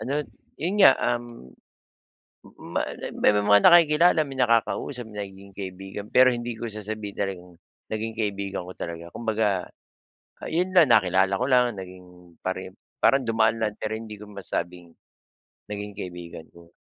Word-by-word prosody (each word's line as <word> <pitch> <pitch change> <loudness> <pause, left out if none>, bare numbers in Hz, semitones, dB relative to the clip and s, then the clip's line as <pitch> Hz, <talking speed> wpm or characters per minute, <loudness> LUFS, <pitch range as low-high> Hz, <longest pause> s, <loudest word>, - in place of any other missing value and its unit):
ano, 135 - -4 0.4
yun 185 +7 -1
nga, 165 - +8 0.2
um, 120 - -7 1.2
ma - - +2 0.3
may - - +4
mga 105 0 +4
nakikilala, 170 0 +6
may 135 - -8
nakakausap, 115 0 0
nagiging 100 -2 -9
kaibigan 95 +1 -7
pero 130 0 +7
hindi 120 -1 -2
ko 115 +1 -6
sasabihin 105 -1 -6
talagang, 95 -3 -4 0.4
naging 110 +1 -3
kaibigan 100 -4 -3
ko 90 - -10
talaga. 85 0 -6
Kumbaga, 105 -5 0 0.8
yon 180 +3 0
lang, 175 -4 +6
nakilala 95 -1 +3
ko 125 - -1
lang, 125 -3 +3
naging 90 -2 -12
pare 95 0 -4 0.3
parang 135 -2 +4
dumaan 115 0 +2
lang 105 -2 -1
pero 110 +1 -4
hindi 110 -2 -8
ko 105 0 -12
masabing, 90 -3 -5 0.7
naging 105 0 -5
kaibigan 90 -4 -8
ko. 85 0 -18
105 Hz, 140 wpm, -25 LUFS, 95-120 Hz, 1.2 s, nga